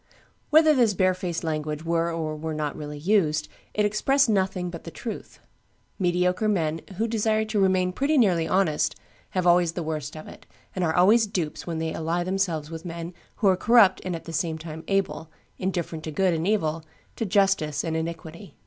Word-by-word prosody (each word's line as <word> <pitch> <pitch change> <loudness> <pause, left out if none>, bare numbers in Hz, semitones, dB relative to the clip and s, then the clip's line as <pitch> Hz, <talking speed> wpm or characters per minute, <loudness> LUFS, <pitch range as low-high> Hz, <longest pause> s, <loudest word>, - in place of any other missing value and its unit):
Whether 310 0 +6
this 235 -7 +3
barefaced 185 -2 0
language 155 -1 -3
were 170 0 +1
or 160 -2 -3
were 155 +1 -4
not 150 -2 -2
really 150 -1 -7
used, 155 -3 +1 0.3
it 210 - +2
expressed 255 +6 +2
nothing 190 -3 0
but 170 - -8
the - - -7
truth: 220 +8 -7 0.6
mediocre 180 +3 +1
men, 165 -6 0 0.2
who 225 +3 0
desire 220 -1 +1
to 215 -1 -1
remain 185 -1 +2
pretty 285 +8 +1
nearly 180 -9 +3
honest, 180 -4 +1 0.4
have 180 - +1
always 175 -1 +4
the 175 - -3
worst 155 -1 -4
of 155 - -9
it, - - -13 0.3
and 185 - -1
are 160 -2 +1
always 215 +5 +5
dupes 180 -7 -4
when 165 -2 -3
they 160 0 -2
ally 165 +2 -1
themselves 175 -5 -1
with 165 0 -7
men 170 0 -6 0.2
who 210 - +1
are 190 - +5
corrupt 210 -1 +5
and 185 -2 -3
at 165 - -7
the 165 - -8
same 160 0 -1
time 160 0 -8
able, 195 -5 -1 0.3
indifferent 175 -4 -3
to 155 - -4
good 185 +3 +2
and 165 +2 -1
evil, 165 -7 0 0.3
to - - -3
justice 195 -8 +1
and 165 -1 -2
iniquity. 165 +3 -6
175 Hz, 190 wpm, -25 LUFS, 160-195 Hz, 0.6 s, Whether